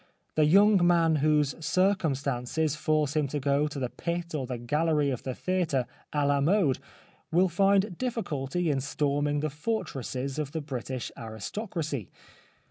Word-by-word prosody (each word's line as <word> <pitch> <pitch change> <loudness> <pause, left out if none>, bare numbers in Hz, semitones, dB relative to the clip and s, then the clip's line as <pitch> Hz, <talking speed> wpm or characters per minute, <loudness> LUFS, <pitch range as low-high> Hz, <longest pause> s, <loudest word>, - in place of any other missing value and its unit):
The 155 - +3
young 200 +3 +6
man 165 -2 +4
whose 150 -1 +2
circumstances 155 -5 +1
force 155 -1 0
him 150 -2 +2
to 145 +2 -3
go 140 +2 +2
to 150 - -7
the 125 -3 -2
pit 170 0 -4
or 135 -4 -2
the 125 -1 -3
gallery 150 +4 +1
of 125 - -3
the 130 -2 -4
theatre 175 -9 0 0.3
a 145 -1 +1
la 140 0 +2
mode 160 -3 +3 0.5
will 180 +3 +4
find 195 +1 +2
difficulty 175 - -1
in 135 -2 0
storming 145 +1 0
the 155 -1 -1
fortresses 140 - -3
of 145 -2 -3
the 160 - -2
British 130 -3 -5
aristocracy. 140 - -5
150 Hz, 150 wpm, -28 LUFS, 140-170 Hz, 0.5 s, young